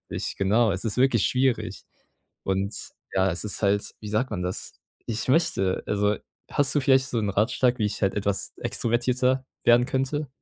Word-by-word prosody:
weiß - - -3
ich - - -6
genau, 105 +2 +3
es 95 +4 -2
ist 110 0 -2
wirklich 125 -5 +3
schwierig. 130 -1 0 0.6
Und 95 +2 -1 0.4
ja, 95 0 +3
es 85 - -4
ist 105 - -4
halt, 100 +1 +1
wie 105 - -7
sagt 110 +5 0
man 90 - -3
das? 90 +1 -3 0.3
Ich 115 +2 -3
möchte, 95 - +2
also, 105 0 +1 0.3
hast 145 -1 +2
du 145 - +3
vielleicht 130 0 +4
so 120 - -1
'n 105 -2 0
Ratschlag, 120 +5 +2
wie 105 - +1
ich 105 - -4
halt 95 - +2
etwas 100 -1 -1
extrovertierter 125 +2 0 0.2
werden 120 +1 +6
könnte? 135 +2 -1
115 Hz, 185 wpm, -25 LUFS, 100-130 Hz, 0.6 s, werden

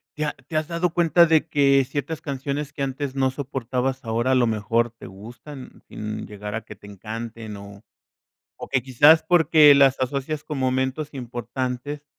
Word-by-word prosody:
¿Te 150 - -2
ha 150 - -2
te 155 - -6
has 155 0 -1
dado 170 0 -1
cuenta 170 0 +5
de 160 0 +3
que 140 -2 +3
ciertas 145 +4 -4
canciones 140 +1 -4
que 140 - -7
antes 135 0 -3
no 135 -1 +2
soportabas 130 -1 -3
ahora 115 +3 0
a - - +4
lo 120 -2 +3
mejor 115 +2 0
te 115 - -14
gustan 120 +8 -12
sin 105 0 -6
llegar 105 +1 -7
a 115 - -3
que 105 - -11
te 100 - -15
encanten 110 +2 -7
o 100 +1 -12 0.7
o - - -9
que 135 -1 +1
quizás 145 +6 +5
porque 155 -4 +6
las 135 -1 +4
asocias 140 +3 -3
con 150 - -5
momentos 130 +3 -1
importantes 125 +3 -5
130 Hz, 175 wpm, -23 LUFS, 115-145 Hz, 0.7 s, porque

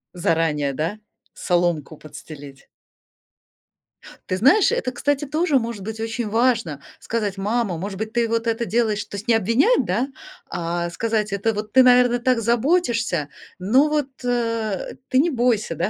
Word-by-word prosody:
Заранее, 160 -5 0
да? 165 +9 -3 0.3
Соломку 175 -4 -1
подстелить. 145 -3 -12 1.6
Ты 185 - 0
знаешь, 280 - +5
это, 475 - -1
кстати, 285 +3 -1
тоже, 305 0 +1
может 230 -3 -5
быть, 220 +2 -6
очень 225 0 -3
важно 225 - +1 0.2
сказать: 210 -4 -3
"Мама, 205 -2 -1
может 195 +3 -5
быть 220 +2 -5
ты 235 -1 +1
вот 230 0 -1
это 230 +1 0
делаешь" 220 -2 0
То - - -9
есть 200 - -8
не 235 - +4
обвинять, 230 - +3
да, 210 +8 0 0.4
а 170 0 -3
сказать: 215 +2 -2
"Это 200 +3 0
вот 210 +1 -6
ты, 260 - +7
наверное, 245 -1 +5
так 250 0 +1
заботишься, 235 - +1 0.3
но 255 +11 +3
вот, 300 -3 0
э, 230 -5 -2
ты 255 - +1
не 330 +5 +3
бойся, 235 - 0
да, 175 +6 -1
225 Hz, 155 wpm, -22 LUFS, 185-245 Hz, 1.6 s, ты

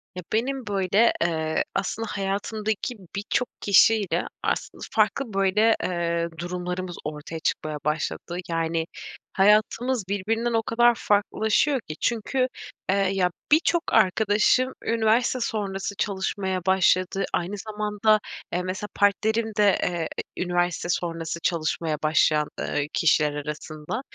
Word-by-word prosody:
Ya 180 - -6
benim 255 +2 -1
böyle 200 +3 +3
eee 160 -2 0
aslında 215 +3 -2
hayatımdaki 210 +4 -2 0.2
birçok 205 +4 -1
kişiyle 205 0 +4 0.2
aslında - - -2
farklı 265 -6 +1
böyle 195 +3 +3
eee 170 -1 -1
durumlarımız 180 +1 -4
ortaya 150 +2 -6
çıkmaya 155 -1 -2
başladı. 155 +3 -2
Yani 165 0 0 0.5
hayatımız 215 +4 +3
birbirinden 225 +4 -1
o 225 0 +2
kadar 240 +2 +4
farklılaşıyor 220 +6 +2
ki. 155 - -8
Çünkü 250 +3 0 0.4
eee 190 - +4 0.2
ya 180 -2 +1 0.2
birçok 330 +2 +4
arkadaşım 220 +5 +3
üniversite 230 +2 +2
sonrası 200 -4 -3
çalışmaya 190 -1 -2
başladı. 190 0 +2
Aynı 180 +4 -1
zamanda, 215 +1 +1 0.3
eee, 180 - +1
mesela 190 +3 -4
partnerim 220 +3 +2
de, 205 -2 +4
eee, 170 -2 -1 0.3
üniversite 175 -1 0
sonrası 165 -1 -2
çalışmaya 160 -1 -1
başlayan, 155 -1 +3
eee, 145 0 -1
kişiler 150 -2 +3
arasında 150 - -5
195 Hz, 115 wpm, -25 LUFS, 170-220 Hz, 0.5 s, kişiyle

